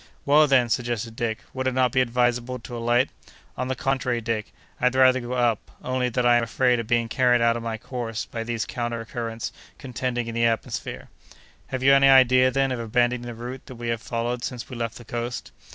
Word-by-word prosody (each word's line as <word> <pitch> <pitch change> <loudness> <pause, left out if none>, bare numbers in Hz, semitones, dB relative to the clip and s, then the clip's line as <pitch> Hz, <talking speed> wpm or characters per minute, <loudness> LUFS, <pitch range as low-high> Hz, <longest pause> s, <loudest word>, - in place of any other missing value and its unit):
"Well, 150 +2 +6
then," 130 -4 +4
suggested 115 -1 -2
Dick, 115 -2 -3
"would 130 0 -2
it 130 - 0
not 130 -2 +3
be 130 - +3
advisable 125 0 0
to 120 0 -9
alight?" 120 +2 +1 0.4
"On 125 - -3
the 130 - -1
contrary, 130 -2 0
Dick, 115 -2 -3 0.3
I'd 125 +1 +2
rather 130 0 +5
go 120 0 -5
up, 120 -4 0
only 130 0 0
that 125 +1 -1
I 120 0 +6
am 120 - +1
afraid 125 +1 +2
of 115 - -4
being 120 -1 +2
carried 125 +1 +3
out 115 0 +3
of 120 - -4
my 115 -1 -3
course 115 -2 -5
by 115 - -5
these 115 -1 -2
counter 120 -1 -4
currents 115 -1 -5 0.2
contending 125 -2 -3
in 115 - -5
the 115 0 +2
atmosphere." 115 -1 -2 0.6
"Have 130 -1 -4
you 135 +1 +7
any 135 0 +6
idea, 130 -1 +6
then, 135 +1 +1
of 125 - -2
abandoning 120 +1 0
the 120 - -6
route 125 +3 -8
that 130 - -9
we 120 0 -5
have 115 -1 -1
followed 120 +1 -3
since 125 -2 -5
we - - -5
left 115 -1 -4
the 120 - -12
coast?" 120 +1 -4
120 Hz, 215 wpm, -24 LUFS, 115-130 Hz, 0.6 s, you